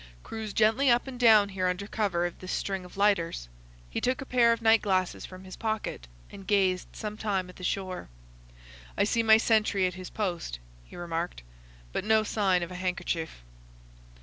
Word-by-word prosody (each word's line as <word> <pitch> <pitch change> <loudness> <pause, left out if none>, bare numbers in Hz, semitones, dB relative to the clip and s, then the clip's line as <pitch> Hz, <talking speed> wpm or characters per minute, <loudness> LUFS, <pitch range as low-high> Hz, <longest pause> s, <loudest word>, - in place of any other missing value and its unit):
"Cruise 220 -1 -6
gently 220 +7 +3
up 240 0 +4
and 260 -2 -8
down 215 -4 +6
here 190 -2 -1
under 180 +2 -2
cover 200 -5 0
of 175 - -5
this 185 - -6
string 195 -2 -2
of 180 +1 -13
lighters." 185 - +1 0.4
He - - -4
took 255 0 0
a 270 - -5
pair 240 -2 +4
of 230 - +1
night 225 -1 +5
glasses 185 -3 0
from 185 0 -11
his 185 0 -9
pocket 215 - -3 0.2
and 195 - -11
gazed 190 -3 +2
some 210 0 -5
time 195 -4 -1
at - - -18
the 185 - -11
shore. 185 - -3 0.9
"I - - +4
see 230 +3 +2
my 220 -1 +7
sentry 215 -4 +2
at 180 - -1
his 185 0 -8
post," 175 - -3 0.3
he - - -14
remarked, 170 - -4 0.5
"but - - -1
no 220 +1 +3
sign 195 -4 +1
of 170 - -6
a - - -7
handkerchief." 170 - -3
195 Hz, 190 wpm, -28 LUFS, 180-220 Hz, 0.9 s, my